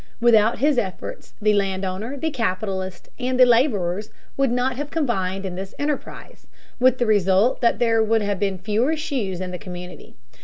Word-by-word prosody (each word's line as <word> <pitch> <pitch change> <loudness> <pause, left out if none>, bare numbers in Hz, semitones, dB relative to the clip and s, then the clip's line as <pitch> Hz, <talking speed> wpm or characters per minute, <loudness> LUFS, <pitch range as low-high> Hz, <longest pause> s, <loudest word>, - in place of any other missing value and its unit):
Without 230 -1 +4
his 285 -2 +3
efforts 190 -5 -6
the 215 0 +3
land 195 -1 0
owner, 210 +9 -4
the 320 +4 -2
capitalist, 190 -5 -3
and 255 0 -1
the 255 - +9
laborers 215 - +2 0.3
would 275 -1 +2
not 250 +2 0
have 290 +2 -4
combined 195 - -1
in 185 - -4
this 190 +2 -7
enterprise, 290 0 -5 0.3
with 255 0 +4
the 245 - +1
result 205 +2 +3
that 235 - +3
there 230 -2 +3
would 220 0 +2
have 200 -2 -1
been 195 -2 0
fewer 220 - 0
shoes 225 - -3
in 185 -1 -4
the 180 - -6
community. 180 -3 -9
215 Hz, 180 wpm, -22 LUFS, 190-250 Hz, 0.3 s, the